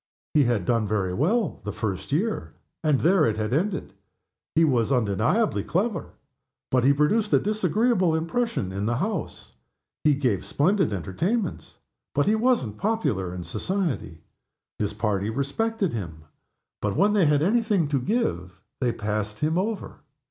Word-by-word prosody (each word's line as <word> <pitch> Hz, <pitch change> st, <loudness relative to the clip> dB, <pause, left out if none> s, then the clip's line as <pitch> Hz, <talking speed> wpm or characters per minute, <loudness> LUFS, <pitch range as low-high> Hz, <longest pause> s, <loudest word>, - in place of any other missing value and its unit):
He 150 Hz, -3 st, +4 dB
had 115 Hz, -7 st, 0 dB
done 115 Hz, -1 st, +1 dB
very 95 Hz, -3 st, 0 dB
well 185 Hz, -, 0 dB
the 105 Hz, -, -3 dB
first 100 Hz, 0 st, -4 dB
year, 205 Hz, +10 st, -1 dB, 0.3 s
and 150 Hz, -4 st, +2 dB
there 175 Hz, +1 st, +4 dB
it 110 Hz, -7 st, +1 dB
had 110 Hz, +2 st, -1 dB
ended. 185 Hz, +7 st, -1 dB, 0.6 s
He 165 Hz, +1 st, +5 dB
was 125 Hz, -4 st, +1 dB
undeniably 120 Hz, -, +1 dB
clever, 195 Hz, +1 st, -1 dB, 0.6 s
but 130 Hz, -2 st, +3 dB
he 135 Hz, -, +6 dB
produced 185 Hz, +10 st, +2 dB
a -, -, +6 dB
disagreeable 210 Hz, -2 st, +1 dB
impression 165 Hz, -, -1 dB
in 100 Hz, +2 st, -2 dB
the 120 Hz, -, +1 dB
House. 190 Hz, -, -3 dB, 0.5 s
He 150 Hz, -2 st, +4 dB
gave 125 Hz, -9 st, 0 dB
splendid 185 Hz, -, +1 dB
entertainments, 165 Hz, -, -2 dB, 0.4 s
but 145 Hz, -, +3 dB
he 210 Hz, -, +3 dB
wasn't 220 Hz, -, +1 dB
popular 195 Hz, -, 0 dB
in 90 Hz, 0 st, -6 dB
society. 130 Hz, -, -2 dB, 0.6 s
His 105 Hz, -1 st, -1 dB
party 105 Hz, -1 st, 0 dB
respected 185 Hz, -, -1 dB
him, 85 Hz, -8 st, -6 dB, 0.6 s
but 105 Hz, -2 st, -1 dB
when 205 Hz, +1 st, +3 dB
they 195 Hz, -6 st, +4 dB
had 145 Hz, 0 st, +3 dB
any 225 Hz, +7 st, +3 dB
thing 205 Hz, -8 st, +1 dB
to 140 Hz, -3 st, +1 dB
give 90 Hz, -, -1 dB, 0.2 s
they 125 Hz, -3 st, +1 dB
passed 105 Hz, -1 st, -3 dB
him 155 Hz, +5 st, 0 dB
over. 200 Hz, +3 st, -2 dB
145 Hz, 155 wpm, -25 LUFS, -, 0.6 s, he